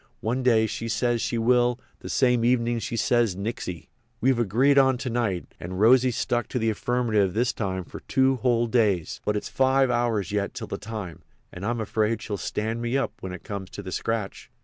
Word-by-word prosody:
One 120 +4 -1
day 115 -3 +4
she 115 +1 -4
says 120 +1 +1
she 120 - -1
will; 120 +1 +3 0.2
the - - -8
same 125 -3 +2
evenin' 120 -1 +2
she 115 - -4
says 115 -4 +2
nixy. 95 - -5 0.3
We've 130 0 +2
agreed 125 +6 +4
on 130 -1 +4
to 125 0 -4
night, 110 -7 -2
and 90 +2 -6
Rosy's 125 +2 +5
stuck 120 -2 0
to - - -3
the 115 -2 +1
affirmative 110 -4 0
this 120 +2 +1
time 95 -3 -3
for - - -10
two 135 -1 +2
whole 120 -1 +2
days. 105 -8 +1
But 105 0 +1
it's - - -4
five 130 -1 +2
hours 115 -6 0
yet 100 -1 -2
till - - -5
the - - -5
time, 105 -7 -7 0.3
and 90 - -8
I'm 120 +3 -1
afraid 110 0 0
she'll 105 - -3
stand 110 +5 -3
me 120 +3 0
up 135 - -1
when 95 - -6
it 90 - -8
comes 100 -2 -6
to 100 - -8
the 95 - -6
scratch." 110 0 -3
115 Hz, 205 wpm, -25 LUFS, 105-125 Hz, 0.3 s, Rosy's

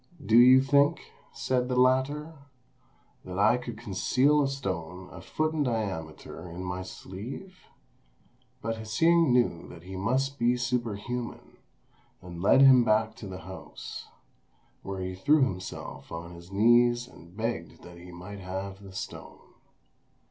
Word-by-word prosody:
"Do 110 - +3
you 130 +2 +8
think," 140 +3 +3 0.3
said 125 +1 -1
the 125 - 0
latter, 130 +5 +2 0.9
"that 90 0 -7
I 110 +4 +4
could 120 -3 -7
conceal 130 +10 +2
a 140 - +2
stone 95 -9 -5
a - - -10
foot 155 0 -1
in 155 - -1
diameter 95 - -4
in 85 +2 -7
my 90 0 -4
sleeve?" 115 - -9 1.0
But 115 +1 -2
Hsing 165 +8 +3
knew 120 -9 +1
that 85 -1 -12
he 95 +1 -8
must 130 +8 -1
be 120 +1 +3
superhuman, 120 -1 -3 0.6
and 85 -1 -9
led 115 +7 +5
him 130 -3 +8
back 110 -1 +2
to 105 - -8
the 95 -1 -7
house, 95 0 -9 0.7
where 95 -1 -5
he 95 0 -3
threw 140 +11 +3
himself 95 -7 -5
on 85 +1 -6
his 85 +2 -13
knees 120 +4 +4
and 85 -5 -16
begged 110 -7 -4
that 90 0 -12
he 90 +1 -11
might 90 +4 -9
have 95 +1 -6
the 95 -1 -12
stone. - - -8
110 Hz, 145 wpm, -28 LUFS, 95-130 Hz, 1.0 s, you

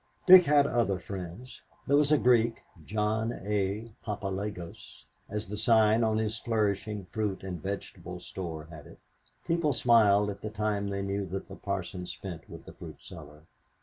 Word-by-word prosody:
Dick 185 -1 +10
had 145 -1 +5
other 115 -7 +1
friends. 95 +6 -8 0.2
There 140 - +3
was 145 0 +4
the 150 - +5
Greek, 120 -3 +3 0.2
John 110 +4 -1
A. 105 +2 -1
Papalagos, 100 - -5 0.2
as 105 +1 -4
the 105 +2 -5
sign 110 +1 +4
on 110 -1 +2
his 110 0 -1
flourishing 105 -2 -1
fruit 105 -4 -2
and 90 -4 -5
vegetable 100 +3 -6
store 80 -4 -6
had 75 -3 -11
it. - - -14 0.5
People 165 -3 +1
smiled 105 -5 +4
at 100 - -10
the 105 - -4
time 105 -1 -1
they 100 0 -3
knew 100 0 -2
that 95 +2 -5
the - - -9
Parson 95 -2 -4
spent 85 -4 -8
with - - -11
the - - -11
fruit - - -10
seller. 75 -3 -12
105 Hz, 165 wpm, -29 LUFS, 95-110 Hz, 0.5 s, Dick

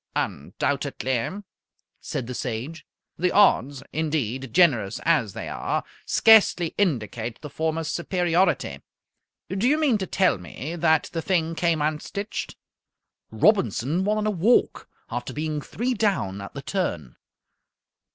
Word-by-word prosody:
"Undoubtedly," 130 - -2 0.6
said 125 - -4
the 125 - -6
Sage. 125 +7 -5 0.3
"The 180 +1 +2
odds, 140 - +3
indeed, 135 -6 -2
generous 120 - +3
as 135 - +2
they - - -6
are, - - -2 0.2
scarcely 205 -6 +5
indicate 115 - -1
the 150 - -8
former's 160 +1 -2
superiority. 175 +1 0 0.7
Do 195 +5 0
you 295 +3 +4
mean 280 -9 +2
to 190 - -3
tell 185 - +2
me 130 - -7
that 160 -2 +2
the 165 - -2
thing 165 -2 0
came 165 -2 +1
unstitched?" 155 +7 -3 0.7
"Robinson 160 - +2
won 210 +2 +1
in 215 - -1
a 215 - +2
walk, 210 +6 +2 0.2
after - - -4
being 155 -1 -2
three 245 - -2
down 190 - 0
at 100 - -9
the 140 - -6
turn. 85 - -3
160 Hz, 130 wpm, -25 LUFS, 130-190 Hz, 0.7 s, scarcely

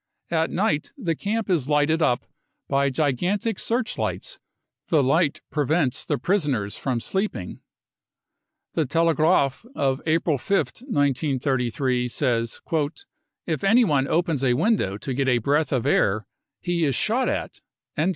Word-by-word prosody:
At 160 -1 +1
night 170 -7 -1
*he 180 -11 -1
camp 210 +7 -2
is 160 -8 0
lighted 150 +2 +2
up 125 -6 +1 0.4
by 140 0 +2
gigantic 175 - 0
searchlights; 240 - -2 0.5
the 155 -4 +3
light 145 +3 +2
prevents 150 -2 0
the - - +1
prisoners 135 - 0
from 130 -3 -2
sleeping. 160 - -3 1.1
The 155 -4 0
Telegraaf 160 - +2
of 135 -1 0
April 155 -2 +1
5th, 200 - -1
1933, 135 - 0
says: 120 -3 -1
44 155 -3 +1 0.6
If - - -2
anyone 195 - +4
opens 160 -4 0
a 125 -2 +3
window 155 - +1
to 130 +6 -4
get 135 +1 0
a 125 -2 +4
breath 145 +6 +1
of 130 -4 0
air, 105 +1 +2 0.4
he 175 -2 0
is 140 -5 +1
shot 245 - +1
at." - - -4
150 Hz, 130 wpm, -24 LUFS, 130-175 Hz, 1.1 s, anyone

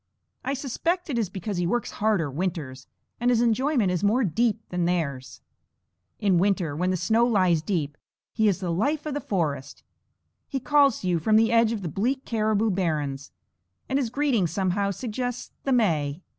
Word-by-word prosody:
I 275 +2 -1
suspect 330 +6 -2
it 240 - 0
is 210 -5 -1
because 190 +1 -4
he 175 -1 0
works 240 +6 -1
harder 205 -9 0
winters, 150 -5 -4 0.3
and 240 +1 +2
his 240 -2 +3
enjoyment 240 -2 +2
is 180 0 -1
more 225 +6 +3
deep 220 +3 0
than 180 -1 -1
theirs. 140 -8 -2 0.8
In 195 -5 +3
winter 180 -6 +1
when 180 +4 0
the 185 - +1
snow 225 +6 +2
lies 185 -8 +3
deep, 155 -4 -2 0.4
he 220 - +2
is 200 -1 +1
the 180 -2 -2
life 285 - 0
of 305 - -3
the 290 - -3
forest. 150 -7 -3 0.6
He 270 - -3
calls 280 -1 +3
to 185 - -3
you 175 -2 +2
from 215 +7 +2
the 225 +1 +4
edges 230 -1 +4
of 215 - -4
the - - -2
bleak 250 - -1
caribou 220 -1 +1
barrens, 150 -7 -2 0.6
and 270 - +1
his 250 -5 -1
greeting 250 -7 +1
somehow 190 +3 0
suggests 245 +4 -4
the 275 - 0
May. 165 - +1
205 Hz, 185 wpm, -25 LUFS, 170-240 Hz, 0.8 s, the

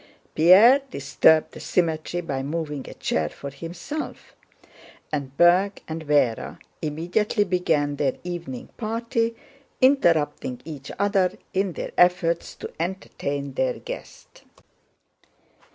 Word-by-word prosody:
Pierre 205 - +7
disturbed 155 - +3
the - - -10
symmetry 170 0 -1
by 140 -6 -3
moving 150 -1 -4
a - - -10
chair 80 -1 -1
for 140 - -8
himself, 170 - -7 0.8
and 140 -2 -4
Berg 180 +4 +4
and 160 -1 -6
Véra 145 -6 +1 0.2
immediately 175 +8 0
began 160 -6 0
their 140 -2 0
evening 170 -8 -6
party, 230 +1 -1 0.4
interrupting 165 - +2
each 145 -4 -8
other 200 -2 +2 0.2
in 190 -1 0
their - - -5
efforts 175 -1 +2
to - - -8
entertain 145 -6 -3
their 130 -1 +1
guest. - - -10
165 Hz, 110 wpm, -24 LUFS, 145-190 Hz, 0.8 s, Pierre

